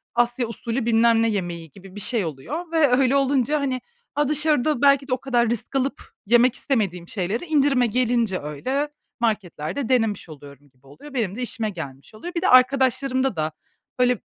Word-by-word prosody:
Asya 240 0 +1
usulü, 230 +1 -4
bilmem 230 0 +4
ne 230 - +2
yemeği 175 -6 -4
gibi 195 +2 -14
bir 205 - -6
şey 230 -4 +3
oluyor 285 - -6
ve 320 -3 +4
öyle 260 +1 +3
olunca, 275 +1 +2
hani, 260 -3 -2 0.5
dışarıda 300 -2 +2
belki 280 -1 +4
de 255 - -1
o 255 - +1
kadar 240 -4 +1
risk 235 +3 -4
alıp 270 +1 -1 0.3
yemek 240 +2 +4
istemediğim 190 -10 -2
şeyleri 200 - -3
indirime 280 -5 +2
gelince 235 -4 0
öyle 260 - -3 0.3
marketlerde 215 - -2
denemiş 225 -8 0
oluyorum 145 -1 -13
gibi 130 0 -27
oluyor. 215 - -13
Benim 215 -6 -2
de 250 - -5
işime 230 -2 -2
gelmiş 140 -3 -9
oluyor. 345 +11 -8
Bir 335 - -1
de - - +1
arkadaşlarımda 260 -1 +3
da 155 0 -2 0.5
böyle, 250 -3 +3
240 Hz, 170 wpm, -23 LUFS, 195-270 Hz, 0.5 s, bilmem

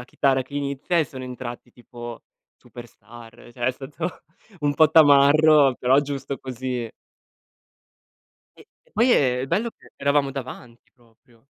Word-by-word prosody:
la - - -9
chitarra 135 0 0
che 135 +2 -14
inizia 140 +4 -2
e 160 - +3
sono 130 -1 -9
entrati 120 -1 -8
tipo 120 -1 -10 0.4
superstar, 120 -1 -14
cioè 120 -1 -5
è - - +3
stato 145 +7 -7 0.4
un 145 -1 0
po' 155 +1 +4
tamarro, 145 -2 +6
però 130 +2 +3
giusto 140 -1 -5
così. 125 -2 -5 1.7
E - - -13 0.3
e - - -29
poi 235 +4 +2
e 125 - +2
il 135 - -5
bello 225 - -1
che - - -22
eravamo 140 0 +1
davanti 125 -3 -10
proprio. 115 0 -28
135 Hz, 145 wpm, -23 LUFS, 120-145 Hz, 1.7 s, tamarro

